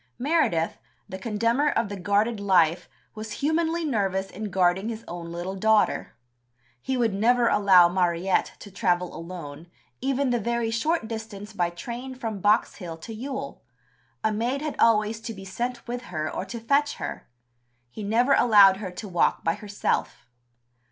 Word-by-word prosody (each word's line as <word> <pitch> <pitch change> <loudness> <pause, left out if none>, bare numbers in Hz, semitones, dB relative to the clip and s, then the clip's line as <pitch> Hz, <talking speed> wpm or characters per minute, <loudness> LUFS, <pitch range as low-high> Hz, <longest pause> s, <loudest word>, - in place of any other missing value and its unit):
Meredith, 250 - +1 0.3
the 190 - -7
condemner 230 +7 +1
of 230 - 0
the 200 - -6
"guarded 205 +4 +1
life," 175 -4 +2 0.2
was 215 0 -7
humanly 325 +3 0
nervous 195 -7 -1
in 215 +1 -5
guarding 190 +3 +1
his 225 -1 -6
own 170 -1 -7
little 175 +3 -4
daughter. 215 - +2 0.7
"He 265 - -2
would 230 -4 +1
never 235 +4 +3
allow 190 -5 +6
Mariette 175 +1 +1
to 205 - -10
travel 180 -3 0
alone, 165 -2 -8 0.3
even 270 0 0
the 240 - +1
very 235 +1 -1
short 235 +3 0
distance 220 -2 -7
by 175 -4 0
train 240 +9 -7
from 225 -5 -4
Box 210 +3 +2
Hill 170 -4 -7
to 225 +8 -9
Ewell; 270 +4 -6 0.6
a 220 - +2
maid 245 +7 -1
had 305 - -3
always 215 -1 +3
to 225 -1 -6
be 195 0 -10
sent 240 +6 -4
with 245 +1 -4
her 155 -3 -3
or - - -3
to 235 +4 -6
fetch 285 +5 +1
her. - - -6 0.6
He 215 - -8
never 235 +6 +3
allowed 205 -7 +6
her 195 -2 -5
to 180 +4 -8
walk 175 -3 +1
by 165 - +2
herself." 205 +1 -3
215 Hz, 165 wpm, -25 LUFS, 185-240 Hz, 0.7 s, allow